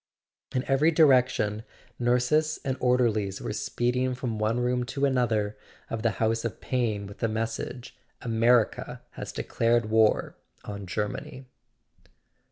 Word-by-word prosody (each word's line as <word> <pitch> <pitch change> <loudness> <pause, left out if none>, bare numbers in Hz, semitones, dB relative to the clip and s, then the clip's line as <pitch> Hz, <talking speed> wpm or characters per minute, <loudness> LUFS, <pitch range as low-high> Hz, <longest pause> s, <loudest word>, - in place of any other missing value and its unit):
In 130 - +1
every 135 +4 +4
direction 125 -9 +3 0.4
nurses 125 +6 +2
and 130 -1 0
orderlies 115 -6 +2
w - - -9
r - - -2
ere - - -2
speeding 125 +1 -1
from 120 -4 -3
one 110 +3 +1
room 125 0 +1
to 140 +3 -1
another 115 -6 +1 0.4
of 115 - -2
the 115 -1 +1
house 115 0 +1
of 115 -5 -4
pain 115 -6 -1
with 100 0 -11
the 115 - +1
message: 115 +2 -4 0.2
"America 115 0 +1
has - - -7
de¬ - - -5
clared 115 -1 +1
war 110 -1 +3 0.3
on 100 -2 -7
Germany." 105 +7 -4
120 Hz, 145 wpm, -27 LUFS, 110-125 Hz, 0.4 s, every